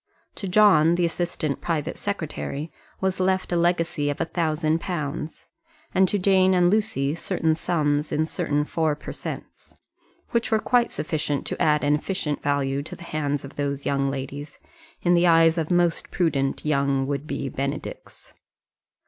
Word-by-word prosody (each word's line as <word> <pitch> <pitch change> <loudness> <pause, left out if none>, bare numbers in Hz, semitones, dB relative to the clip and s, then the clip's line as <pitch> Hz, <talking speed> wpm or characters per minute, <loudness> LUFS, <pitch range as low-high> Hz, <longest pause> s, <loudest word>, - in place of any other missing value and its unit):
To 195 - -5
John, 180 -4 +5
the 175 0 +2
assistant 165 -4 -2
private 160 -4 -2
secretary, 160 -5 -4 0.3
was 190 0 0
left 185 0 +1
a - - +1
legacy 170 -3 +1
of 145 - -3
a - - +1
thousand 160 -1 0
pounds; 155 -3 -4 0.5
and 190 0 +4
to 205 - +1
Jane 190 -1 +4
and 175 0 +4
Lucy 205 -10 +1
certain 160 -1 0
sums 150 -3 0
in 155 +1 +1
certain 150 -2 -1
four 160 -1 0
per - - -8
cents., - - -8 0.6
which 235 -1 +1
were 220 - +3
quite 240 +2 +2
sufficient 150 -2 -2
to - - -4
add 150 -1 +3
an 145 0 +3
efficient 150 -1 -2
value 140 -1 0
to 145 - -8
the - - -12
hands 145 -4 -2
of 135 - -12
those 140 -1 -2
young 140 -1 +1
ladies 140 +2 -6 0.5
in 175 - +4
the 175 0 +4
eyes 165 0 +5
of 160 - -2
most 175 -1 +1
prudent 140 -7 0
young 140 -2 +1
would 140 +1 -3
be 140 - -3
Benedicts. 140 +2 -6
155 Hz, 165 wpm, -24 LUFS, 145-175 Hz, 0.6 s, John